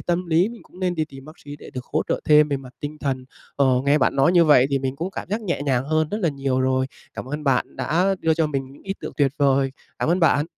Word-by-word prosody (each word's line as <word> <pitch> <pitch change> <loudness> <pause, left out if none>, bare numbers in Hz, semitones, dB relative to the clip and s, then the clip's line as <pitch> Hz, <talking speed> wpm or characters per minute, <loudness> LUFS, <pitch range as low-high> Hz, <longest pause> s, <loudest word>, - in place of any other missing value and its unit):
tâm 175 +1 -1
lý 170 +4 +3
mình 235 0 -11
cũng 180 - -17
nên 180 -1 0
đi 160 -2 0
tìm 135 -3 -13
bác 155 +3 -13
sĩ 145 0 -8
để - - -12
được 125 -1 -7
hỗ 155 - +2
trợ - - 0
thêm 150 0 +5
về 140 - 0
mặt 130 -2 -11
tinh 150 +1 -6
thần. 130 -3 -2 0.3
Ờ, 140 - +3 0.2
nghe 140 +2 +4
bạn 135 - +1
nói 140 +5 +4
như 175 -2 +6
vậy 140 -5 +6
thì 140 - +2
mình 135 0 -3
cũng 170 +6 -3
cảm - - -7
giác 210 +3 -1
nhẹ 175 -9 -2
nhàng 130 -3 0
hơn 155 +1 +1
rất 210 - -3
là 175 - +2
nhiều 135 -3 -1
rồi. 130 0 +1 0.3
Cảm - - -6
ơn 150 +4 -5
bạn 135 -3 0
đã 185 +5 +1
đưa 160 -1 +2
cho 160 -1 +1
mình 135 -3 -4
những 140 - -17
ý 195 - -4
tưởng - - -6
tuyệt 140 -3 +2
vời. 135 -1 +2 0.3
Cảm - - -1
ơn 175 +3 +2
bạn! 155 -2 +3
150 Hz, 290 wpm, -23 LUFS, 135-165 Hz, 0.3 s, như